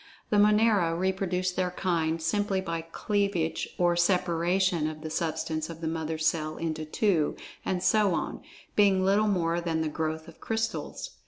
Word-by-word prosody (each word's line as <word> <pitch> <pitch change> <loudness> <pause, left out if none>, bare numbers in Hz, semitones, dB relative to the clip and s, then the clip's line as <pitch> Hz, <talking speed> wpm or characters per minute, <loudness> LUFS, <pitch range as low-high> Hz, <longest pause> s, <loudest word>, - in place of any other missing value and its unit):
The 210 - +3
Monera 210 -5 +4
reproduce 185 0 0
their 180 0 -1
kind 165 -3 0
simply 195 +4 0
by 165 -3 -3
cleavage 180 0 -1
or 175 -1 +3
separation 175 -1 +2
of 155 0 -8
the 155 - -6
substance 160 -1 -2
of 165 -1 -8
the 165 - -3
mother 160 0 -2
cell 155 0 0
into 155 -1 -3
two, 160 -1 +1 0.3
and 180 -1 -1
so 210 -5 +3
on, - - -3 0.3
being 195 -2 +4
little 205 +3 +3
more 170 -4 +1
than 165 -2 -1
the 160 - 0
"growth" 160 +1 -3
of 165 - -14
crystals. 225 0 -3
175 Hz, 160 wpm, -28 LUFS, 160-190 Hz, 0.3 s, Monera